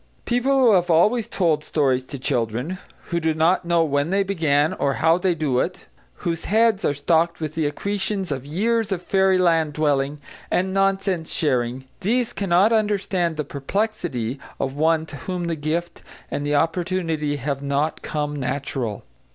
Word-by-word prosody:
People 250 +3 +2
who 250 -4 +6
have 180 -3 +3
always 210 +8 +3
told 160 -5 +1
stories 135 -5 +1
to 140 - -7
children, 125 +6 -2 0.3
who 170 - +1
do 160 -1 0
not 170 +3 +2
know 170 -1 +3
when 145 0 0
they 195 +2 +2
began 160 -6 +1
or 140 -1 0
how 165 +2 +3
they 180 -1 +1
do 145 -6 0
it; 180 +6 -3 0.4
whose 165 -2 -2
heads 220 0 +3
are 145 - +1
stocked 165 +3 +1
with 155 -2 -4
the 160 -2 0
accretions 195 +3 -2
of 135 -2 -3
years 210 +9 0
of 180 -2 -2
fairyland 180 -6 +3
dwelling 145 -1 0 0.3
and 190 +1 0
nonsense 195 -3 +1
sharing, 130 -3 0
these 230 +5 0
cannot 195 +3 +3
understand 195 -6 0
the 150 - -1
perplexity 140 - -3 0.2
of 135 -1 -1
one 160 +2 +2
to 145 - -9
whom 180 +1 -4
the 170 -1 -1
gift 165 +3 -3 0.3
and 145 - -2
the 145 0 0
opportunity 165 -2 0
have 140 0 -3
not 140 +2 -1
"come 150 -1 -3
natural." 130 -5 -3
165 Hz, 165 wpm, -23 LUFS, 145-190 Hz, 0.4 s, who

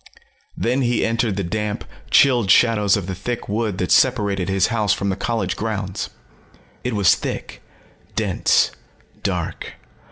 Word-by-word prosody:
Then 125 +4 0
he 120 -2 +1
entered 115 -2 0
the 100 - -2
damp, 105 +3 -3 0.2
chilled 120 -7 +4
shadows 105 -3 +4
of 100 - -4
the 95 - -4
thick 115 +6 -4
wood 105 -2 -1
that 90 -2 -2
separated 100 -7 +2
his 95 +1 +2
house 105 -4 +2
from 100 - -2
the 95 - 0
college 100 -2 -2
grounds. 105 -3 -3 0.7
It 125 - -2
was 100 -3 +5
thick, - - -5 0.5
dense, - - +2 0.5
dark. - - -3
105 Hz, 140 wpm, -21 LUFS, 95-115 Hz, 0.7 s, was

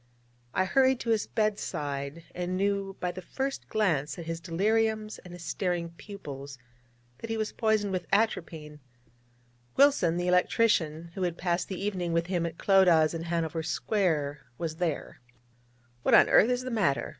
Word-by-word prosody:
I 185 - +3
hurried 260 +5 +3
to 230 - -1
his 220 -2 +1
bed 215 -2 0
side, 145 +2 -4
and 180 +1 -2
knew 195 0 -1
by 180 - -1
the 185 +1 -8
first 270 +8 -4
glance 155 -10 0
at 170 - -7
his 165 0 -4
deliriums 215 +5 0
and 180 - -11
his 175 -1 -9
staring 175 -1 -2
pupils 145 -8 -9 0.6
that 230 - -7
he 225 - -1
was 215 -1 -2
poisoned 220 -3 +1
with 180 -1 -3
atropine. 165 -8 -1 1.0
Wilson, 270 - +4
the 175 0 -1
electrician, 170 -3 +2
who 190 - -6
had 175 -2 -1
passed 175 -1 -1
the 190 - -5
evening 185 -4 -2
with 170 0 +1
him 175 -2 -1
at 165 - -8
Clodagh's 175 -5 +4
in 165 0 -4
Hanover 165 -1 -1
Square, 160 -5 0 0.2
was 160 -1 -4
there. 170 -7 -3 0.8
'What - - +4
on - - +7
earth 225 - +6
is 250 0 +1
the 255 - -4
matter?' 190 -12 +1
180 Hz, 165 wpm, -28 LUFS, 165-210 Hz, 1.0 s, on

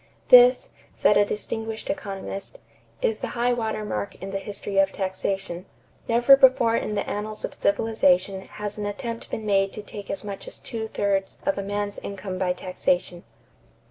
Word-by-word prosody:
"This," - - +7 0.2
said 210 - +4
a 205 - +6
distinguished 220 +2 -4
economist, 200 - -5 0.5
"is 455 -3 +1
the - - -3
high 245 +1 +2
water 220 -2 -2
mark 105 - -3
in 195 +1 -7
the 195 - -2
history 200 0 -3
of 195 0 +4
taxation. 190 -1 -3 0.4
Never 240 +4 +7
before 255 -4 +5
in 210 - -1
the 205 - -2
annals 210 +1 -3
of - - -7
civilization 195 -3 +2
has 210 +1 -6
an 205 - -2
attempt 230 +2 -5
been 220 - -4
made 195 -1 +2
to 210 - -7
take 205 -1 -9
as 195 - -3
much 200 -2 -7
as - - -7
two 220 -1 -5
thirds 200 -2 -1
of 290 - +2
a - - -3
man's 205 +1 -3
income 190 -2 -6
by 185 -1 +1
taxation." 180 -1 -1
205 Hz, 175 wpm, -25 LUFS, 195-225 Hz, 0.5 s, This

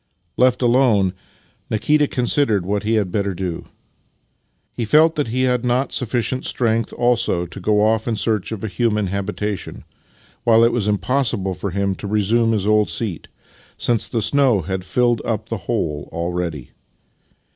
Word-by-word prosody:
Left 125 0 +2
alone, 120 -6 +3 0.6
Nikita 150 +7 +2
considered 120 -7 +1
what 100 +2 -1
he 110 +2 0
had 100 -4 0
better 100 -1 -1
do. 85 -2 -4 1.1
He 120 - -2
felt 155 +8 +4
that 145 -4 -1
he 125 +3 -1
had 125 -1 +1
not 125 +2 0
sufficient 125 +1 -1
strength 115 -2 0
also 120 -7 +1
to 90 +3 -9
go 105 +2 +2
off 110 +1 +1
in 115 - 0
search 110 -2 -1
of 110 -2 -5
a - - -1
human 105 +1 0
habitation, 100 +1 -4 0.6
while 115 -1 +5
it 115 - +4
was 110 -4 0
impossible 105 -2 0
for 90 +3 -4
him 100 +1 -1
to 100 - -7
resume 110 +3 +2
his 105 -3 0
old 105 0 +3
seat, 105 -8 -2 0.5
since 120 -2 0
the 115 -3 -2
snow 130 -4 +3
had 95 +3 -4
filled 120 +5 +1
up 110 -1 -3
the 115 - -2
hole 80 -11 -2
already. 85 -5 -4
110 Hz, 160 wpm, -20 LUFS, 100-120 Hz, 1.1 s, while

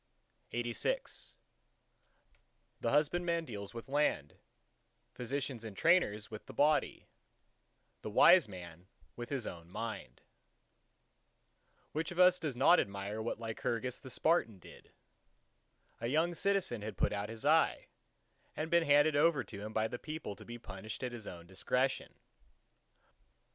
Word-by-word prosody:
LXXXVII 120 - -2 1.5
The 115 - +1
husbandman 170 +4 +1
deals 100 -4 -7
with 115 - -7
land; 135 - 0 0.7
physicians 130 -1 -3
and 110 -3 -8
trainers 115 - +3
with 110 - -8
the - - -10
body; 150 +3 +2 1.0
the - - -5
wise 170 - +7
man 90 -1 -10 0.3
with 120 0 -6
his 135 -5 -2
own 85 -1 -8
Mind. 100 - -6
LXXXVIII - - -42
Which 155 +1 -2
of 175 - -8
us 180 0 +6
does 150 -6 -3
not 140 +8 +6
admire 100 +2 -3
what 115 0 -3
Lycurgus 115 +2 -3
the 130 - -10
Spartan 130 - +1
did? 90 - -15 1.1
A 115 - -2
young 160 +6 +2
citizen 195 - 0
had 105 -2 -6
put - - +1
out 105 0 -3
his 115 +3 -8
eye, 160 +2 +3 0.7
and 155 +1 -3
been 170 0 +5
handed 145 0 +4
over 145 -2 +4
to 100 - -9
him 105 +1 -6
by 110 0 +1
the 120 - -6
people 155 -9 -6
to - - -12
be 120 0 -8
punished 105 +1 -8
at 125 - -2
his 120 -3 -8
own 85 -1 -8
discretion. 125 +8 -1
120 Hz, 140 wpm, -34 LUFS, 105-155 Hz, 1.5 s, wise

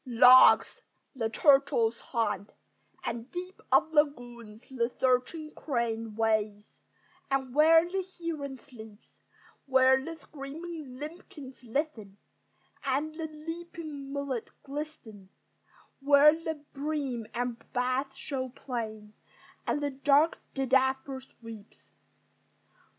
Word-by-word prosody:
Logs, 250 +1 +7 0.3
the 225 -4 -1
turtles 240 -3 +3
haunt; 205 -4 -2 0.5
and 235 +2 -4
deeps 365 +2 -7
Of 320 - +4
lagoons 240 -7 -1
the 240 -3 -1
searching 260 +6 0
crane 230 -5 -3
Wades; 215 -2 -1 0.5
and 265 -2 -1
where 325 +3 +6
the 380 +2 -2
heron 305 -6 -4
sleeps; 220 -6 -15 0.5
Where 265 0 +5
the 330 +3 -6
screaming 305 -1 -8
limpkins 295 -4 -10
listen, 230 -6 -3 0.7
And 285 +4 -1
the 320 0 -5
leaping 310 -2 -8
mullet 280 -4 -3
glisten; 275 -9 -8 0.7
Where 285 +2 +6
the 320 0 -4 0.2
bream 275 -5 -3
and 240 -1 -3
bass 255 +2 0
show 260 -3 -4
plain, 220 -5 -6 0.5
And 290 - 0
the 285 - 0
dark 285 +4 +3 0.2
didapper 265 0 +1
sweeps. 225 -4 -14
265 Hz, 100 wpm, -29 LUFS, 235-300 Hz, 0.7 s, Logs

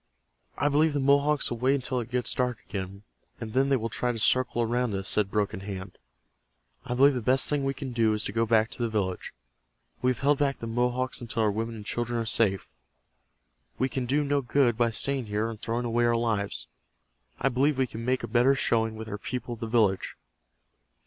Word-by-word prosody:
"I 145 - +1
believe 150 +2 +3
the 145 - 0
Mohawks 140 +1 +2
will 120 - -3
wait 130 +3 +3
until 130 -1 -2
it 120 -1 -5
gets 125 0 -1
dark 125 -2 0
again, 100 0 -6 0.4
and 110 -2 -6
then 135 +1 +2
they 135 - +4
will 115 -3 -1
try 125 +2 -1
to 120 - -5
circle 120 +1 +2
around 120 -1 0
us," 95 0 -2
said 105 -2 +1
Broken 100 -2 -1
Hand. 95 -1 -7 0.8
"I 125 - -3
believe 140 +3 +6
the 125 - -2
best 130 +3 +3
thing 145 -2 +1
we 135 0 -1
can 135 -4 -6
do 115 -2 +2
is 105 +1 -1
to - - -2
go 115 +2 0
back 110 0 +3
to - - -7
the 120 - 0
village. 95 -4 -2 0.7
We 125 - +2
have 125 - -2
held 145 +1 +3
back 140 -1 +1
the - - -7
Mohawks 125 +3 -1
until 115 -1 -2
our 105 - +3
women 115 +2 -3
and 105 -2 -9
children 120 +1 -2
are 115 - -2
safe. 105 -4 0 1.1
We 130 - 0
can 130 -2 -3
do 145 +4 +2
no 145 0 +1
good 125 -2 +2
by 120 +1 +2
staying 130 +2 -1
here 105 +2 -1
and 115 -2 -7
throwing 120 +2 -2
away 120 0 +1
our 120 0 +3
lives. 110 -4 -1 0.7
I 135 - +2
believe 135 +3 +1
we 130 - +2
can 115 -2 -7
make 130 +1 0
a - - -3
better 125 +3 +4
showing 115 -3 +1
with 110 0 -7
our 105 -1 -5
people 125 +1 -4
at 115 - -9
the 115 - -4
village." 110 -5 +1
120 Hz, 220 wpm, -27 LUFS, 110-130 Hz, 1.1 s, believe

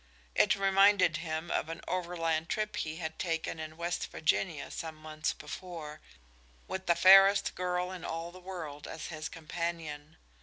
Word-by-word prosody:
It - - +4
reminded 195 -3 +5
him 160 0 -4
of 155 - 0
an 165 0 -6
overland 170 -2 -1
trip 215 -1 -1
he 155 -4 -2
had 160 -2 -5
taken 165 -2 -2
in 155 0 -7
West 170 0 -2
Virginia 160 0 0
some 160 -1 -5
months 155 0 -3
before, 160 -4 -8 0.7
with 190 0 -5
the 170 - +5
fairest 195 +2 +7
girl 180 0 -1
in 185 -3 -7
all 165 +1 -4
the 185 - -12
world 170 -6 -7
as 160 - -6
his 155 -1 -5
companion. 160 -2 -5
170 Hz, 155 wpm, -31 LUFS, 160-185 Hz, 0.7 s, fairest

